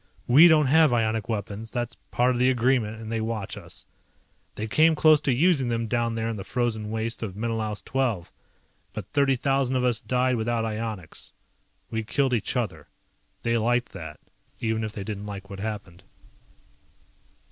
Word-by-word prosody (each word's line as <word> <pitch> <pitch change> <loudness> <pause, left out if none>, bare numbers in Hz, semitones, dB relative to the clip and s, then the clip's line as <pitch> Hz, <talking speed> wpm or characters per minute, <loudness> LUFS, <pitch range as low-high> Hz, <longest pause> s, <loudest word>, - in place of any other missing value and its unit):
We 145 +8 +8
don't 155 -3 +5
have 155 +1 +5
ionic 110 -2 0
weapons, 110 0 -4
that's 120 -1 -3 0.2
part 125 +1 +2
of 120 - -1
the 125 +1 +4
agreement 120 -3 +1
and 110 0 -7
they 115 -1 -1
watch 110 -3 -3
us. - - -9 0.7
They 110 - -3
came 155 +8 +4
close 155 -1 +5
to 145 - +1
using 140 0 +3
them 115 -1 -1
down 115 0 0
there 115 0 -1
in 115 -1 -3
the 95 - -5
frozen 115 -3 -2
waste 115 +1 -2
of 100 -5 -4
Menelaus 110 -1 -2
XII, 125 -9 0 0.7
but - - -5
thirty 140 -2 +3
thousand 135 0 +1
of 125 - +1
us 125 -2 +1
died 125 0 +1
without 115 0 0
ionics. 110 -5 -5 0.6
We 110 0 -2
killed 135 +4 0
each 120 +2 -1
other. 100 -10 -3 0.6
They 115 0 +1
liked 120 +2 +1
that, 80 -4 -9 0.4
even 110 -2 -1
if 110 - -3
they 105 -2 -6
didn't 105 0 -5
like 100 0 -8
what 100 - -7
happened. 100 -4 -6
115 Hz, 175 wpm, -26 LUFS, 110-125 Hz, 0.7 s, We